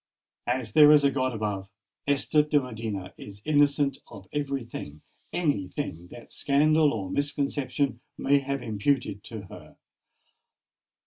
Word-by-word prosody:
As 120 -3 -1
there 150 +4 +8
is 150 -1 +6
a 140 - +4
God 130 -2 0
above, 105 -4 -3 0.4
Esther 145 +2 +3
de 150 0 +2
Medina 110 -7 -5
is 100 0 -10
innocent 145 -2 +3
of 100 -4 -12
every 140 -3 -2
thing—any 100 - -4
thing 90 - -5
that 120 +6 -13
scandal 150 +2 +3
or 100 -4 -4
misconception 140 -2 -1 0.2
may 140 +1 +3
have 140 -1 -3
imputed 110 -1 -1
to 110 -3 -6
her. 95 - -13
135 Hz, 130 wpm, -27 LUFS, 105-145 Hz, 0.4 s, there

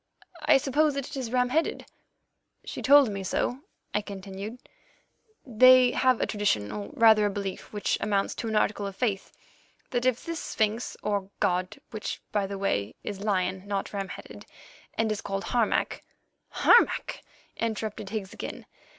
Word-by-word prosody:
I - - +7
suppose 290 +2 +1
that 275 -2 -3
it - - -8
is 255 -4 -4
ram 250 0 +2
headed." 320 +5 0 0.8
"She - - -6
told 280 -2 +7
me 200 -1 -4
also," 220 +6 -1 0.3
I 210 - +1
continued, 200 +2 -7 0.9
"that 230 -5 -12
they 255 -1 +8
have 255 -2 +2
a - - +1
tradition, 110 - 0
or 105 -1 -5
rather 220 -2 +6
a - - 0
belief, 195 -1 -5
which 210 -1 -1
amounts 200 -2 0
to 230 - -5
an 220 - -2
article 205 -1 +1
of 195 - -7
faith, 205 -4 -1 0.6
that 245 0 +1
if 255 -2 0
this 335 -1 -3
sphinx 220 +2 -1
or 200 -2 -1
god, 180 0 0
which, 215 -2 -4
by 200 -2 0
the 200 0 -5
way, 105 - -1
is 200 - -5
lion, 190 -2 0
not 200 0 -3
ram 195 -1 -3
headed, - - -10 0.5
and 225 -1 +1
is 210 - -2
called 195 0 -3
Harmac——" 235 -3 0 0.5
"Harmac!" 475 - +3 0.4
interrupted 215 -3 -3
Higgs 200 -2 -4
again. - - -7
210 Hz, 165 wpm, -27 LUFS, 195-245 Hz, 0.9 s, they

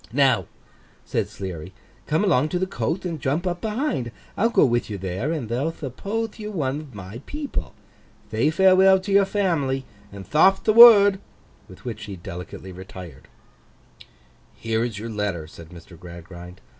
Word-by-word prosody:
'Now,' 125 - +2 0.6
said - - -2
Sleary, 95 -1 -7 0.3
'come 155 +6 +1
along 155 -7 +2
to 180 - -1
the 185 - 0
coath, 165 +4 -3
and 165 -5 -4
jump 150 +8 -1
up 175 -1 -2
behind; 210 - -2 0.2
I'll 230 - +2
go 195 -9 +4
with 120 -2 0
you 105 - -4
there, 95 - -3
and 150 -8 -3
they'll 125 +8 -1
thuppothe 200 - -5
you 210 0 -5
one 145 -7 -2
of 145 -7 -12
my 100 +5 -9
people. 295 -1 -5 0.6
Thay - - +2
farewell 190 +3 +5
to 195 +2 -6
your 200 0 +5
family, 160 -10 -1 0.3
and 100 -1 -9
tharp'th 190 +5 +4
the 215 - +3
word.' 205 -4 +9 0.5
With 95 - -15
which 110 -3 -6
he 100 -2 -7
delicately 90 +1 -9
retired. 90 -6 -11 1.3
'Here 115 0 -1
is 120 -4 -4
your 110 +3 -6
letter,' 100 -7 -3
said 80 0 -13
Mr. 85 -1 -14
Gradgrind. 90 +1 -11
130 Hz, 165 wpm, -23 LUFS, -, 1.3 s, word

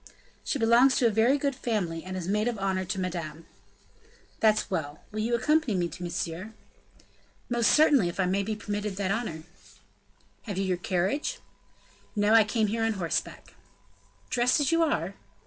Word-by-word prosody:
"She - - -1
belongs 240 +2 +5
to 245 - +2
a 230 - +4
very 230 +6 +3
good 280 -1 -1
family 195 -10 -2
and 185 0 -5
is 180 -2 -5
maid 210 +3 +1
of 240 -2 -1
honor 190 -1 -1
to 190 +2 -3
Madame." 165 -3 -4 0.9
"That's 215 -2 +2
well. 150 -5 -3
Will 215 - -4
you 230 +2 +1
accompany 300 -2 +1
me 175 -1 0
to - - -10
Monsieur?" 175 +4 -4 0.9
"Most 235 -1 +2
certainly, 290 - +5
if 175 - -8
I 190 - +3
may 190 +2 +1
be 215 +2 -3
permitted 205 -1 -4
the 195 -1 -1
honor." 200 -8 -3 1.0
"Have 200 -3 -4
you 195 - 0
your 185 -2 0
carriage?" 190 +10 -1 0.8
"No; 205 +1 +3
I 225 -1 +8
came 215 +1 0
here 225 +2 -2
on 225 0 +1
horseback." 175 -5 -3 0.8
"Dressed 245 +4 +3
as 290 0 +1
you 330 0 +3
are?" 325 - 0
210 Hz, 175 wpm, -27 LUFS, 185-235 Hz, 1.0 s, I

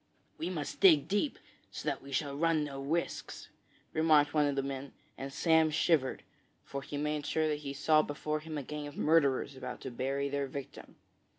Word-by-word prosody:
'We 170 - -2
must 155 -6 -4
dig 160 -7 +6
deep, 205 +9 0 0.3
so - - -7
that - - -1
we 140 - -11
shall 140 +1 -1
run 165 0 +2
no 140 -2 -5
risks,' 160 +5 -3 0.4
remarked 155 -2 +4
one 150 -2 +3
of 140 - 0
the 135 - 0
men, 135 0 -5 0.2
and 135 +1 -6
Sam 160 +2 +4
shivered, 155 -3 +1 0.4
for 140 - -5
he 145 - -6
made 150 0 -1
sure 155 +1 +1
that 150 -1 -1
he 140 -2 -5
saw 155 +2 +4
before 150 +1 -3
him 155 0 -6
a 145 - -3
gang 150 +2 -5
of 145 - -10
murderers 140 -3 +3
about 125 -1 -6
to 130 - -5
bury 135 +3 -1
their 140 0 -1
victim. 140 +1 -8
145 Hz, 195 wpm, -32 LUFS, 140-155 Hz, 0.4 s, dig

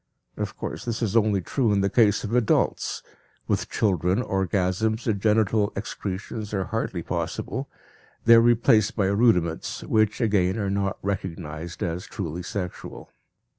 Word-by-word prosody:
Of - - -4
course, 75 +3 -5
this 115 0 -3
is 110 -1 -1
only 105 -4 +3
true 120 +4 0
in 100 -1 +2
the 100 - +2
case 105 0 +3
of 105 - -4
adults; 120 -3 +1 0.4
with - - -1
children 95 +1 +1
orgasms 95 +4 0
and 105 -4 0
genital 105 -1 +2
excretions 100 +1 -5
are 95 - 0
hardly 95 -5 -3
possible; 130 +11 -3 0.6
they 115 - +8
are 115 - +8
replaced 115 -3 +4
by 100 - +1
rudiments 95 -5 +1
which, 110 -1 +1
again, 100 -4 +2
are 100 -3 -1
not 100 -1 -1
recognized 85 -4 -4
as 85 +1 -3
truly 90 -5 -5
sexual. 90 0 -6
100 Hz, 145 wpm, -25 LUFS, 95-110 Hz, 0.6 s, they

